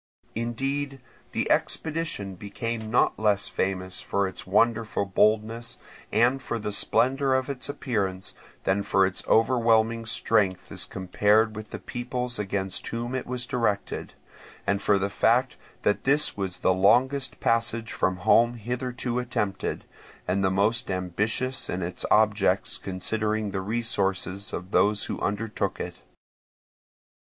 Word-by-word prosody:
Indeed 135 +5 -2 0.3
the - - -1
expedition 160 -11 -1
became 110 +3 -4
not 120 - +2
less 105 -2 +2
famous 95 -1 -2
for 100 -1 0
its 95 - -7
wonderful 110 +1 +2
boldness 110 +4 +1 0.3
and 125 +4 +3
for 120 - -3
the 105 -1 -3
splendour 130 +5 +2
of 130 +1 0
its 130 -1 -5
appearance, 100 -10 -2 0.3
than 95 +1 +2
for 95 -1 +3
its 95 0 -2
overwhelming 115 -1 +3
strength 100 -5 +1
as - - -4
compared 105 +4 +2
with 110 0 -7
the - - -5
peoples 125 -1 -4
against 95 -2 -2
whom 120 +2 -3
it 130 - -3
was 125 0 -2
directed, 115 -5 -1 0.5
and 100 0 +1
for 105 - +3
the 100 0 0
fact 120 +5 +2 0.3
that 105 - +1
this 145 +3 +2
was 95 -3 -3
the 95 - +4
longest 130 +8 +3
passage 115 0 +1
from 95 0 +1
home 120 +1 +5
hitherto 125 +1 -3
attempted, 105 -5 -2 0.4
and 95 +2 +1
the 95 - +3
most 105 +5 +1
ambitious 105 +8 -1
in 90 0 -2
its 90 +1 -4
objects 105 -2 +3
considering 105 +2 -1
the 95 - -2
resources 100 -3 -1
of 90 +2 -6
those 105 0 +3
who - - -4
undertook 105 +2 -2
it. - - -5
110 Hz, 135 wpm, -26 LUFS, 100-120 Hz, 0.5 s, home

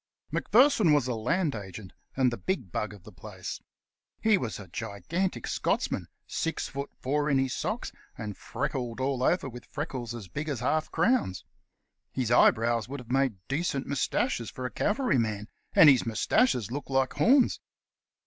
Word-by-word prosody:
Macpherson 230 - +4
was 145 -4 +3
a 125 - 0
Land 145 +8 0
Agent, 95 -2 -8 0.2
and 130 -2 +4
the 120 - -4
big 130 - -3
bug 105 +3 -2
of 100 -4 -13
the 105 - -12
place. 85 -5 -8 0.6
He 220 -1 +4
was 115 - -3
a 100 - -9
gigantic 115 - -3
Scotchman, - - -1 0.2
six 165 - -2
feet 140 0 -5
four 145 +3 0
in 140 - +3
his 135 -1 +1
socks, 220 +3 -3 0.3
and 105 -3 -5
freckled 120 +4 -3
all 130 -1 0
over 160 +3 +2
with 120 -1 -9
freckles 130 -6 -4
as 110 -5 -8
big 150 - -4
as 135 -5 -2
half 155 +5 +1
crowns. 165 - +1 0.7
His 125 -3 -1
eyebrows 115 -1 +4
would 140 +1 -5
have 125 -1 -10
made 130 -9 0
decent 140 -1 -1
sized - - -12
moustaches 130 -4 0
for 130 - -6
a 125 - -3
cavalryman, 115 - 0 0.3
and 160 - +8
his 135 -4 +7
moustaches 120 - +1
looked 145 +2 -5
like 135 -1 +1
horns. 245 - +4
130 Hz, 165 wpm, -28 LUFS, 115-150 Hz, 0.7 s, and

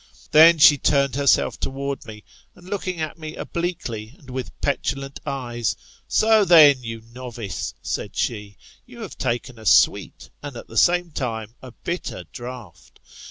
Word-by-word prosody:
Thep 160 +2 +7
she 145 -1 +7
turned 140 -1 +2
herself 140 -1 +2
towards 140 0 -4
me, 105 -1 -10 0.3
and 180 - -17
looking 185 -3 -4
at 155 +1 -5
me 155 -1 -7
obliquely, 135 -10 -5
and 130 -3 -14
with 130 0 -6
petulant 135 -1 -2
eyes, 120 -5 -2 0.3
So 220 -1 +4
then, 150 -7 +7
you 115 -1 -6
novice^ 115 -2 -7
said - - -4
she, 105 -3 -3 0.3
you 240 -1 -12
have 215 - -7
taken 120 -1 -3
a 110 - -13
sweet, - - +2
and 140 -4 -8
at - - -9
the 115 - -13
same 175 +7 +3
time, 115 -6 -4
a 130 - -10
bitter 170 - -5
draught. 120 - -10
135 Hz, 155 wpm, -22 LUFS, 115-160 Hz, 0.3 s, Thep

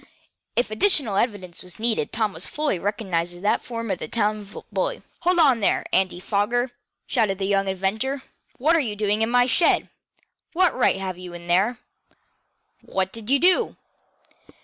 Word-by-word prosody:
If 240 -2 +1
additional 235 - +2
evidence 195 -5 -2
was 180 -2 -10
needed 225 -8 +2
Tom 215 -3 0
fully 295 - -1
recognized 175 -4 -2
the 205 +3 +1
form 230 -3 -5
as - - -2
that - - -4
of - - -14
the - - -6
town 210 -1 -2
bully. - - -2 0.2
"Hold 360 +1 +2
on 275 -8 +5
there, 205 - +1
Andy 185 -2 +2
Foger!" 230 +6 0 0.3
shouted 195 -3 +1
the 195 - -2
young 195 0 +1
inventor. 215 +9 -1 0.3
"What 310 +6 +3
are - - +4
you 225 -8 -2
doing 210 +1 0
in 225 - +2
my 245 0 +4
shed? 255 +7 +2 0.6
What 360 -1 +3
right 245 -6 +2
have 185 -2 -4
you 180 -1 -8
in 170 0 -9
there? 195 +8 +2 1.0
What 190 0 -2
did 225 0 -9
you 280 - +5
do?" 370 - +3
215 Hz, 170 wpm, -24 LUFS, 190-245 Hz, 1.0 s, on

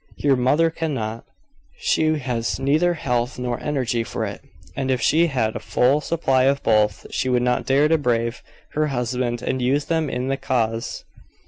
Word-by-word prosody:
Your 140 -2 +3
mother 145 +6 +2
cannot. 115 -9 -3 0.5
She 160 - +1
has 125 -4 -2
neither 155 +6 +2
health 125 -5 -1
nor 125 -1 -3
energy 130 -6 -1
for - - -3
it; - - -6 0.3
and 135 -1 -2
if 130 -1 +1
she 160 +7 +3
had 115 -7 -1
a - - -2
full 135 +4 +2
supply 135 -6 +1
of 140 +1 +1
both, 105 -2 +2
she 130 - -1
would 125 -1 +2
not 125 +1 0
dare 140 +3 +4
to 160 0 +2
brave 115 -3 0 0.3
her 155 0 0
husband 125 -2 -2
and 130 - -1
use 140 +4 +1
them 160 -3 0
in 125 0 -3
the 135 0 0
cause. 115 -4 -2
130 Hz, 180 wpm, -22 LUFS, 120-150 Hz, 0.5 s, dare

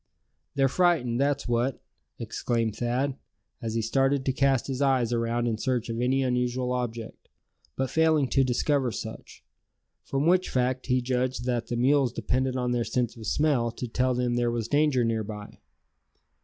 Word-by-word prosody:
"They're 135 -1 +3
frightened, 135 -6 +2
that's 140 -1 0
what!" 120 +2 0 0.4
exclaimed 115 -3 -2
Thad, 125 +4 -1 0.4
as 115 -1 -3
he 115 - 0
started 135 +3 +1
to 130 - +1
cast 135 -2 +2
his 135 0 -3
eyes 130 -4 +2
around 115 0 0
in 110 -2 -1
search 125 -1 -1
of 115 +1 -2
any 130 +2 +2
unusual 125 0 0
object, 120 -3 -4 0.5
but 130 -1 -2
failing 160 -3 +3
to 135 - +3
discover 130 +1 +1
such; - - -8 0.6
from 135 +2 -1
which 180 +2 +3
fact 130 +1 -1
he 125 -1 +1
judged 125 0 -1
that 120 -2 -1
the 120 - -3
mules 135 +1 +3
depended 130 +2 -1
on 125 -1 -1
their 120 -1 +1
sense 120 -1 -1
of 110 -2 -8
smell 145 -6 +2
to 125 - -5
tell 125 +2 0
them 125 0 0
there 120 0 +1
was 115 -2 -2
danger 145 -2 +2
near 115 -1 0
by. 105 0 -9
125 Hz, 170 wpm, -27 LUFS, 120-135 Hz, 0.6 s, They're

